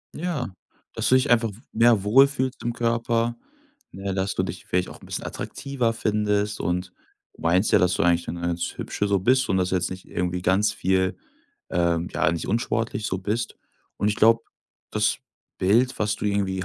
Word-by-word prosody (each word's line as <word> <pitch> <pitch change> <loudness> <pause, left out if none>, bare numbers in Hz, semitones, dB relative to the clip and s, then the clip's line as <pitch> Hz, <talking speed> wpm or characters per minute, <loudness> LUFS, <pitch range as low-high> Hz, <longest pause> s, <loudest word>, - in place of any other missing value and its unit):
Ja 150 - -3 0.4
dass - - 0
du 130 - +6
dich 130 +1 +2
einfach 115 -2 +4
w 100 - -11
mehr 115 -3 +4
wohl 135 +7 +6
fühlst 130 -2 -3
im 120 - -1
Körper, 115 0 0 0.6
ne, 95 0 -4
dass 95 0 -1
du 95 - +1
dich 90 -1 -6
vielleicht 90 0 0
auch - - -11
'n - - -14
bisschen - - -4
attraktiver 130 -4 -2
findest 105 -1 0
und 90 +1 -2 0.4
du - - -18
meinst 90 +5 +2
ja, - - +6
dass 90 0 +2
du - - +1
eigentlich 85 -1 +2
'ne 85 0 -5
ganz 85 0 -2
Hübsche 105 - -2
so 100 -1 +2
bist 130 +6 +2
und 95 - +2
dass 90 0 +1
du - - 0
jetzt 90 -1 0
nicht 95 0 -8
irgendwie 90 0 -2
ganz 100 +3 +3
viel, 95 -2 0 0.5
ähm 85 -1 +1
ja, - - +1
nicht 85 +1 -4
unsportlich 115 0 -1
so 95 - -2
bist 105 +5 -3 0.4
und 105 - +1
ich 105 - 0
glaube, 115 +1 +4 0.5
das - - +1 0.4
Bild, 115 +7 +2
was 105 0 0
du - - -6
irgendwie 95 -2 0
105 Hz, 200 wpm, -24 LUFS, 90-115 Hz, 0.6 s, du